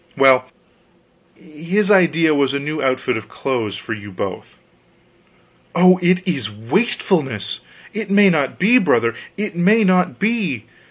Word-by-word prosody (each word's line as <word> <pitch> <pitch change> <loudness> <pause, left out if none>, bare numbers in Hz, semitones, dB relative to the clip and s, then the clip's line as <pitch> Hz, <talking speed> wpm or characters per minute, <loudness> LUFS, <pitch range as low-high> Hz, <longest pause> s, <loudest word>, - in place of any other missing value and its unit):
Well, 130 -2 +5 0.9
his 170 +7 -2
idea 165 -4 +3
was, 140 -1 0
a - - -1
new 150 +2 -4
outfit 130 -2 -1
of 110 -1 -9
clothes 115 -7 -3
for 115 - -6
you 105 -1 -9
both 95 - -7 0.6
" - - -32
"Oh, 185 +1 +5
it 185 +2 +1
is 135 - -2
wastefulness! 135 - -1 0.3
It 215 -1 -5
may 200 -1 +5
not 145 -5 -1
be, 235 +7 +4
brother, 115 - +1 0.2
it 205 -3 -4
may 205 +6 +3
not 185 -2 +1
be. 195 - -2
155 Hz, 145 wpm, -18 LUFS, 125-190 Hz, 0.9 s, Well